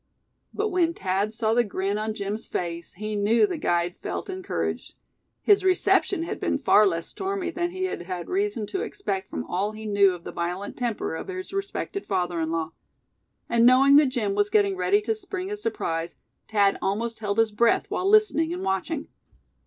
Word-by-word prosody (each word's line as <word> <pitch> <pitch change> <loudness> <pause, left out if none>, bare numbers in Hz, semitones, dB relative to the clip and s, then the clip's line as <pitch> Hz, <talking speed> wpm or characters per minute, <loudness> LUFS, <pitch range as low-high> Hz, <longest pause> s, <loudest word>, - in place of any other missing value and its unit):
But 425 +1 -1
when 345 -3 +1
Thad 195 +2 -1
saw 220 0 0
the 240 +1 +4
grin 200 -1 -2
on 215 0 -2
Jim's 205 +1 -4
face 170 -1 -4
he 215 +2 -4
knew 210 - +4
the 365 -6 -4
guide 175 - 0
felt - - -4
encouraged. 375 0 -4 0.5
His 410 -2 +5
reception 375 -1 +2
had 335 - -4
been - - 0
far 210 0 +5
less 165 -3 -1
stormy 385 -2 -3
than 345 0 -1
he 375 +1 -4
had 375 - -2
had 175 -1 -5
reason 395 - -1
to 380 - 0
expect 195 - -4
from - - -4
all 200 +4 -2
he 220 0 -8
knew 200 -3 +4
of 170 - -13
the - - -6
violent 180 +4 -4
temper 240 -8 -2
of 160 - -5
his 375 0 -6
respected 395 0 -4
father 180 -3 -1
in 160 - -1
law. 165 -1 -2 0.8
And 235 -1 +3
knowing 260 +3 +7
that 295 -1 +6
Jim 225 -6 -1
was 205 +1 +1
getting 200 -2 +3
ready 185 +3 +2
to 225 +1 0
spring 370 - -5
his 420 0 -5
surprise, 165 - -2 0.3
Thad 200 -2 +3
almost 225 +4 -1
held 205 -1 -2
his 225 -1 +3
breath 230 +3 +3
while 380 - 0
listening 415 -7 +4
and 355 - -4
watching. 195 - -2
220 Hz, 190 wpm, -25 LUFS, -, 0.8 s, knowing